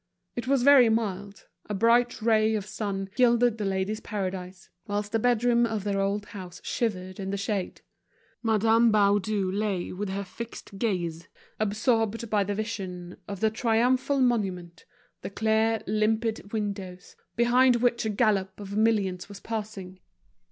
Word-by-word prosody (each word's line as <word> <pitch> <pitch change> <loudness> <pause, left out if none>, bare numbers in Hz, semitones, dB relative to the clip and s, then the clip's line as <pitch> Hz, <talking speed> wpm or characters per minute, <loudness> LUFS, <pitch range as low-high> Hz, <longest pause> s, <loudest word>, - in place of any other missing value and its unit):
It 240 0 -4
was 270 -2 +2
very 265 -4 +7
mild, 205 -3 -2 0.2
a 210 - -1
bright 235 +2 +2
ray 220 -1 +3
of 205 -3 -3
sun 200 -2 -4
gilded 240 -2 +3
The 210 - -1
Ladies' 195 +2 -1
Paradise, 185 -3 -5 0.2
whilst 205 0 -2
the 225 - +1
bedroom 240 0 +3
of 220 -4 -1
their 200 -1 -1
old 200 +1 -1
house 185 -4 -9
shivered 185 -5 -3
in 195 -1 -4
the 200 - -2
shade. 200 -1 -3 0.6
Madame 225 +1 +3
Baudu 205 -1 +2
lay 200 -2 -2
with 200 +2 -4
her 200 +1 -3
fixed 200 -1 -9
gaze, 175 -7 -2 0.3
absorbed 225 +1 0
by 210 -2 +3
the 200 +1 -3
vision 190 -5 -5
of 200 -2 -6
the 220 -1 +3
triumphal 250 +5 +1
monument, 190 -9 -1 0.4
the - - -5
clear, 220 +2 +1
limpid 215 0 0
windows, 200 -4 -5 0.2
behind 245 +2 +4
which 240 0 +1
a 220 - -1
gallop 200 -3 +1
of 200 -1 -7
millions 205 -4 +1
was 200 -1 -9
passing. 205 -5 -6
210 Hz, 150 wpm, -27 LUFS, 195-230 Hz, 0.6 s, very